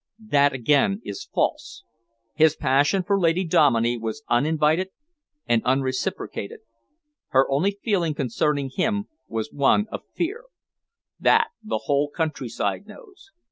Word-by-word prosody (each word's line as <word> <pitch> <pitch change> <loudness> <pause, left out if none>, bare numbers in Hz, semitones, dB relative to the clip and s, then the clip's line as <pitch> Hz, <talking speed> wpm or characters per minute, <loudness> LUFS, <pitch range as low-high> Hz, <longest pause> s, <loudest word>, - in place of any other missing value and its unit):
"That 145 0 +5
again 145 - +2
is 415 - -7
false. 305 +5 -2 0.5
His 155 0 +4
passion 145 +8 +2
for 200 +1 +1
Lady 170 +1 +2
Dominey 120 -7 +3
was 115 +6 -5
uninvited 155 +7 +2 0.6
and 115 -1 +2
unreciprocated. 130 -5 -2 0.7
Her 135 0 +3
only 190 +9 +1
feeling 175 -8 0
concerning 140 +2 -1
him 205 +1 0 0.2
was 110 -1 -4
one 145 +9 +3
of - - -5
fear; 405 +9 -3 0.7
that - - +4
the 160 - -3
whole 145 +2 +1
countryside 160 0 -3
knows. 395 -9 -15
150 Hz, 120 wpm, -24 LUFS, 135-195 Hz, 0.7 s, That